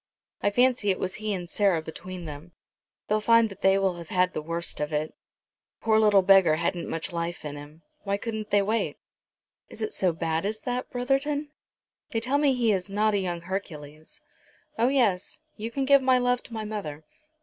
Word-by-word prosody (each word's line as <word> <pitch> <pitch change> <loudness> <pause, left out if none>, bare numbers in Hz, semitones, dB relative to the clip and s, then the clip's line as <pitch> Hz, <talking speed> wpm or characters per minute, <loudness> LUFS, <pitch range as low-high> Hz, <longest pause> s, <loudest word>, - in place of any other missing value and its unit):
I - - +3
fancy 245 0 +2
it 190 - +2
was 185 - -3
he 215 0 -2
and 180 -3 -3
Sarah 195 -2 +2
between 180 +2 -8
them. 155 +3 -9 0.5
They'll 215 0 +1
find 230 0 +5
that 195 - -12
they 195 0 +4
will 190 -2 0
have 170 -2 -9
had 180 0 +2
the - - -3
worst 170 +2 -2
of 150 +1 -2
it. 155 +1 -1
The - - -29 0.7
poor 220 -1 +4
little 205 -3 +5
beggar 190 -4 +6
hadn't 170 +1 -2
much 165 +3 -2
life 170 -1 -4
in 145 -1 -5
him. 150 +3 -12 0.2
Why 200 -1 -2
couldn't 220 0 -5
they 205 0 +3
wait?" 220 +3 -1 0.7
"Is - - -7
it 435 - -3
so 185 -2 +2
bad 160 0 -2
as 215 +2 -3
that, 250 0 -3
Brotherton?" 280 +4 -1 0.6
"They 225 - -1
tell 260 +5 0
me 285 -3 +3
he 235 -3 +2
is 190 -1 -1
not 210 +2 +1
a 200 - +2
young 175 -3 -3
Hercules. 155 -5 -7 0.5
Oh 230 +2 +2
yes; 230 -9 +1 0.2
you 220 +2 -5
can 270 +3 -2
give 280 0 +6
my 260 -1 +4
love 245 0 +1
to 235 - -12
my 220 -1 -4
mother. 175 -9 -5
200 Hz, 205 wpm, -26 LUFS, 170-230 Hz, 0.7 s, beggar